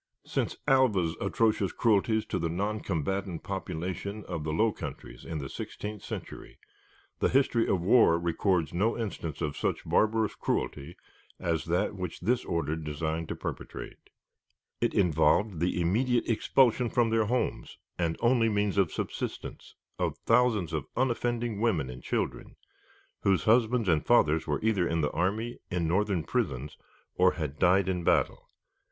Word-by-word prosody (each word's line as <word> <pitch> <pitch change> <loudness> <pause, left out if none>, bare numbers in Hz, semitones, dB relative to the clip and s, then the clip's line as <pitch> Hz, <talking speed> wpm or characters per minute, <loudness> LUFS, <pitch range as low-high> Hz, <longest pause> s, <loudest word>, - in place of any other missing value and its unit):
Since - - -2
Alva's 105 -12 +3
atrocious 105 -1 +1
cruelties 110 -1 +2
to - - -2
the 85 - -1
noncombatant 95 -1 -2
population 95 +5 -4
of 75 - -4
the 80 - -2
Low 110 +8 +2
Countries 65 -8 -8
in 80 - -5
the 70 -3 -4
sixteenth 105 +8 -6
century, - - -8 0.6
the - - +2
history 125 -3 +2
of 95 - +1
war 95 -4 +5
records 85 -1 0
no 105 +7 +1
instance 85 - -4
of 75 -2 -2
such - - -2
barbarous 110 0 +2
cruelty 75 +5 -3 0.4
as 85 -3 -1
that 90 +4 0
which 90 -3 -6
this 120 +7 +1
order 80 -2 -1
designed 80 +1 -3
to - - -3
perpetrate. - - -7 0.7
It - - +1
involved 85 +2 +3
the 90 +1 0
immediate 120 +8 +1
expulsion 120 +1 +3
from 120 -2 +2
their 110 -1 +3
homes 125 +3 -2 0.2
and 85 -2 0
only 120 -1 +3
means 105 -2 +1
of 95 -5 +2
subsistence - - -5 0.2
of - - -1
thousands 115 -7 +3
of - - -2
unoffending 120 -3 0
women 85 - +1
and 60 0 -10
children, - - -3 0.6
whose 95 -5 +2
husbands 115 0 +3
and 80 -4 +3
fathers 80 +2 +3
were 75 - -1
either 105 -6 +2
in 80 0 0
the 75 - 0
army, 105 +7 -1
in 90 -3 -1
Northern 95 0 +1
prisons, 75 - -2 0.4
or 90 0 +4
had 75 -4 -5
died 95 +1 +4
in 90 -2 -1
battle. - - +1
95 Hz, 150 wpm, -29 LUFS, 80-110 Hz, 0.7 s, war